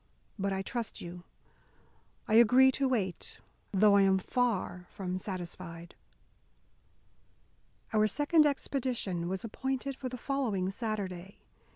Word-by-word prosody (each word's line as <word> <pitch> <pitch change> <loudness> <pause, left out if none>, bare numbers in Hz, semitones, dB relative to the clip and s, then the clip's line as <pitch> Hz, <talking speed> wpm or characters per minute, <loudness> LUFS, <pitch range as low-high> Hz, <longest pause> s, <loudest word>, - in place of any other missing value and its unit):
But 195 0 0
I 190 0 -2
trust 235 +2 -4
you, 175 0 -9 1.0
I 215 - -1
agree 245 +4 +7
to 270 +1 0
wait, 200 -9 -2 0.3
though 205 +1 +5
I 200 - +6
am 190 -1 +4
far 190 -4 -1
from 185 -2 -4
satisfied." 175 -2 -7 2.0
Our 215 0 +4
second 295 - +4
expedition 240 -11 -2
was 190 0 -3
appointed 265 +4 -3
for 260 -1 -5
the 250 - -6
following 225 -8 -1
Saturday. 195 -4 -4
205 Hz, 115 wpm, -31 LUFS, 185-255 Hz, 2.0 s, agree